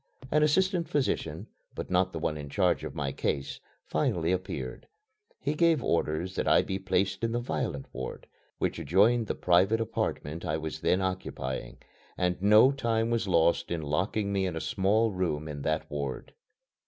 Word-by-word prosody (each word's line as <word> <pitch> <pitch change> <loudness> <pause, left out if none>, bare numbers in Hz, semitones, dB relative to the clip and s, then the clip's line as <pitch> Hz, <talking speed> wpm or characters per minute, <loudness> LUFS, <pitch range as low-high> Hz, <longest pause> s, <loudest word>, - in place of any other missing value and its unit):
An 150 - +4
assistant 175 +3 +2
physician, 145 -3 -1 0.3
but - - -6
not 90 +1 +2
the 85 - -5
one 80 -1 -1
in 75 -1 -7
charge 90 +2 +1
of - - -6
my 70 -2 -2
case, 70 0 -2 0.3
finally 85 0 0
appeared. 90 -8 -4 0.5
He 145 - -1
gave 165 -3 +3
orders 85 +2 0
that - - -2
I - - +5
be 95 0 -3
placed 95 +3 0
in 115 0 0
the 120 - +1
violent 70 - -3
ward, 65 - -6 0.3
which - - -1
adjoined 105 - +3
the - - -2
private 95 +5 +3
apartment 85 -7 -3
I 75 - -1
was 80 -1 -5
then 95 - +2
occupying, 65 -10 -4 0.4
and 90 -1 0
no 105 +6 +7
time 115 -4 0
was 115 -3 0
lost 85 -2 +3
in 85 -2 -2
locking 100 +7 -1
me 95 -1 +1
in 90 - -4
a - - -2
small 105 +6 +1
room 85 -5 -2
in 75 -2 -6
that 80 +2 -1
ward. 70 -3 -4
95 Hz, 175 wpm, -29 LUFS, 80-110 Hz, 0.5 s, no